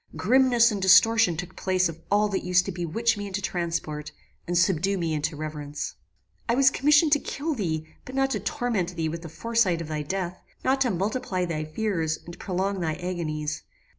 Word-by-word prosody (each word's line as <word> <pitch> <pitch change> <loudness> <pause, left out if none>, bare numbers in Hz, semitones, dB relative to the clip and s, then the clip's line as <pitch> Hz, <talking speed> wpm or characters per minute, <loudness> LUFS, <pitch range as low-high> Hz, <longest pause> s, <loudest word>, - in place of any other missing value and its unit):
Grimness 245 +2 +4
and 205 -2 -3
distortion 195 -1 +5
took 180 +1 -6
place 185 -1 +1
of 165 0 -8
all 210 +1 +3
that 195 - -2
used 180 0 +3
to 195 - -3
bewitch 200 +6 0
me 205 0 -4
into 195 0 -3
transport, 165 -5 -3 0.4
and 175 0 0
subdue 185 +2 +2
me 165 -3 -1
into 150 +1 -1
reverence. 150 -1 -5 0.6
"I 235 - +3
was 270 +1 +5
commissioned 295 +3 +4
to 290 - +5
kill 305 +3 -3
thee, 160 - -2 0.2
but 255 - -9
not 270 0 +2
to 210 - 0
torment 200 -3 -2
thee 160 -1 -1
with 165 +1 -5
the 165 - -8
foresight 225 -2 +1
of 165 -2 -6
thy 155 -1 -2
death; 180 +3 -4 0.2
not 265 +1 +2
to 255 - +3
multiply 190 -1 -1
thy 155 -3 -3
fears, 160 -2 -1
and 170 +1 -10
prolong 190 +1 -2
thy 160 -3 -1
agonies. 160 -4 -3
185 Hz, 195 wpm, -26 LUFS, 165-220 Hz, 0.6 s, distortion